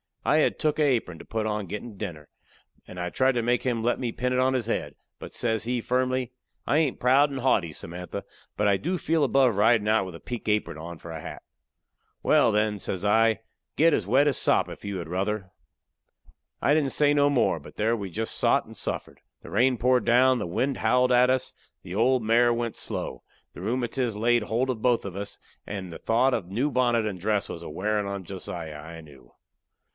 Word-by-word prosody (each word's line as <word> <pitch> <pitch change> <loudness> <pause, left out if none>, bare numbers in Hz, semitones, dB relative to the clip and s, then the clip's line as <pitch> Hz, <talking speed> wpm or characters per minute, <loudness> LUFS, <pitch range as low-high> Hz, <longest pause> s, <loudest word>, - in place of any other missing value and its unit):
I 150 - +4
had 155 - +2
took 155 -1 0
a - - +4
apron 120 - 0
to - - -11
put 110 -1 -2
on 105 0 -1
a 100 - -8
gettin' 105 +3 -7
dinner, 85 -8 -7 0.6
and 90 - -9
I 90 0 -2
tried 130 +5 +2
to 120 -2 -1
make 120 +1 +1
him 120 -3 -1
let 120 - +1
me 120 -3 -2
pin 125 +2 -2
it 125 - +1
on 130 +1 +3
his 125 -3 -1
head. 75 -10 -2 0.2
But - - -9
says 110 -2 -1
he, 125 +1 -1
firmly: 130 0 0 0.3
"I 145 - +2
hain't 155 -5 +1
proud 135 +4 +4
and 135 - -4
haughty, 105 -10 +1
Samantha, 90 +4 -7 0.3
but 105 - +2
I 100 -1 +3
do 180 - -2
feel 160 -1 +1
above 135 -4 +3
ridin' 110 +1 +3
out 110 -2 +3
with 90 - -8
a - - -9
pink 120 -3 -7
apron 105 -6 0
on 85 +2 -8
for 85 - -10
a 80 - -6
hat." - - -8 0.8
"Wal, - - +4
then," 105 0 +1
says 95 -1 -4
I, 110 +1 +3 0.3
"get 165 +1 +4
as - - 0
wet 135 +7 +4
as 140 - +2
sop, - - +2
if - - -10
you 100 -1 -3
had 85 -3 -5
ruther." 95 +2 -2 1.1
I 145 - +4
didn't 145 -4 +1
say 145 -1 +3
no 145 0 +4
more, 140 - +2
but 70 - -14
there 110 +2 +1
we 100 -4 -5
jest 110 +5 -3
sot - - +2
and - - -12
suffered. - - -5 0.2
The - - -11
rain 125 +4 +3
poured 125 +2 +2
down; 130 +2 +5
the - - -3
wind 130 +10 -1
howled 125 0 +2
at 125 +1 +5
us; 130 -1 -1 0.3
the 90 - -8
old 125 +3 +2
mare 120 +2 +4
went 115 -1 -3
slow; - - -4 0.3
the - - -10
rheumatiz 120 -1 -1
laid 120 +2 +2
holt 120 +5 -1
of 115 -4 -6
both 120 -4 +2
of 95 -2 -6
us; 100 +1 -5 0.3
and 95 -3 -5
the - - -8
thought 125 +4 +2
of 100 -8 -2
the 95 - -11
new 135 +7 0
bonnet 120 -3 +2
and 100 -4 -4
dress 105 +2 0
was 85 - -6
a - - -7
wearin' 105 +5 -1
on 100 -1 -4
Josiah, 85 -4 -7
I 80 +2 -9
knew. 70 -6 -17
115 Hz, 225 wpm, -26 LUFS, 100-125 Hz, 1.1 s, down